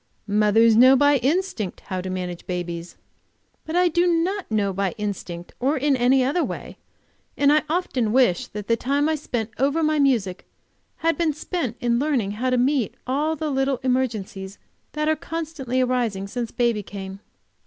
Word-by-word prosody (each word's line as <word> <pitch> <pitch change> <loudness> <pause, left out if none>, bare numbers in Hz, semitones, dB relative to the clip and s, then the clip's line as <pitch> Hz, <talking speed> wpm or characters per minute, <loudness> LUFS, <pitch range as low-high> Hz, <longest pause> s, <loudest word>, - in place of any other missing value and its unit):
Mothers 215 +2 +4
know 255 +4 +7
by 285 +1 +4
instinct 270 - -1
how 185 -2 -4
to 185 - -5
manage 180 -2 -5
babies." 175 -1 -5 0.7
But 315 - -3
I 360 0 +4
do 345 +1 +2
not 355 +4 0
know 205 -3 0
by 195 0 -1
instinct, 195 -5 -5
or 275 +4 +1
in 280 +1 +2
any 255 +1 +3
other 290 +7 +1
way, - - -6 0.6
and 285 0 +4
I 305 - +4
often 275 -10 0
wish 240 -8 +3
that 210 -1 -7
the 230 - +3
time 280 +5 0
I 315 - +1
spent 240 -7 -3
over 285 +5 +2
my 310 0 +2
music 225 -10 +1 0.6
had 330 +1 +2
been 325 -3 +2
spent 295 -6 -4
learning 240 -3 +1
how 240 +5 -2
to 255 - +2
meet 255 -2 +1
all 295 +5 0
the 310 0 -3
little 270 -1 0
emergencies 215 -7 -2 0.4
that 305 0 -1
are 315 - +3
constantly 305 -6 -3
arising 240 -6 0
since 235 +3 -4
baby 235 -3 0
came. 195 -1 -8
255 Hz, 170 wpm, -23 LUFS, 210-295 Hz, 0.7 s, know